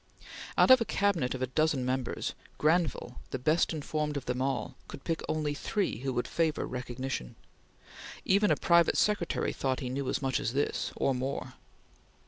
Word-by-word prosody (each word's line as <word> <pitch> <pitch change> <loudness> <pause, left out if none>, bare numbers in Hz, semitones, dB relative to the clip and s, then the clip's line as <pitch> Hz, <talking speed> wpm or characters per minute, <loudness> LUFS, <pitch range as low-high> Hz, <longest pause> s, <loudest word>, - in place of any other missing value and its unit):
Out - - +6
of 260 -2 +8
a - - +2
Cabinet 185 -13 +1
of 130 - -3
a - - +3
dozen 140 0 +1
members, 130 -1 -2 0.2
Granville, 155 -6 +1
the - - -2
best 155 +6 +2
informed 150 -1 -2
of 135 - -5
them 125 +1 -2
all, 135 0 -1
could - - -9
pick 165 - -2
only 150 -2 0
three 190 - -1
who 135 +1 -2
would 120 0 -1
favor 160 -2 0
recognition. 125 - -4 0.9
Even 200 +2 +4
a - - +4
private 170 -1 +4
secretary 205 -5 +1
thought 130 -1 -1
he 130 -4 -4
knew 135 +1 -2
as - - 0
much 135 -2 0
as 115 - -2
this, 145 +2 -1
or 135 - +1
more. 130 +2 -3
140 Hz, 175 wpm, -30 LUFS, 130-165 Hz, 0.9 s, of